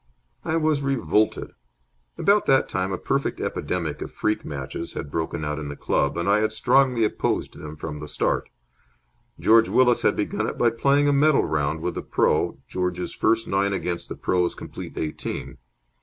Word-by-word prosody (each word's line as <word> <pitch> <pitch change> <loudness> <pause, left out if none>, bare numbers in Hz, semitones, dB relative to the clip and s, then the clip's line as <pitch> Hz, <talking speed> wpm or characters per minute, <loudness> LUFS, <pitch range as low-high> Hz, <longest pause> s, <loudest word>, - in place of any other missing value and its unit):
I 160 - 0
was 155 -2 +1
revolted. 125 -6 +1 0.7
About 205 +1 +3
that 135 -1 +4
time 95 0 -2
a 95 - -1
perfect - - -1
epidemic 85 -5 -3
of - - -5
freak 105 - -1
matches 70 +3 -6
had 70 -3 -6
broken 80 -1 -2
out 75 +1 -2
in 75 -1 -5
the 70 - -6
club, 70 +1 0
and 85 - -1
I 100 +1 +4
had 110 0 +1
strongly 125 +2 +3
opposed 105 - -1
them 75 0 -8
from 75 0 -6
the 75 - -7
start. 75 - -1 0.9
George 115 0 +5
Willis 125 -1 +4
had - - +3
begun - - -1
it - - -7
by 120 -1 +3
playing 140 +5 +2
a 145 - +4
medal 145 +1 +4
round 80 +1 -1
with - - -2
the - - -4
pro., - - +1
George's 90 -1 -2
first 115 +1 +1
nine 100 +1 +1
against 90 -2 -3
the - - -5
pro.'s 90 -1 0
complete - - -9
eighteen. 75 -1 -4
95 Hz, 180 wpm, -24 LUFS, 80-125 Hz, 0.9 s, George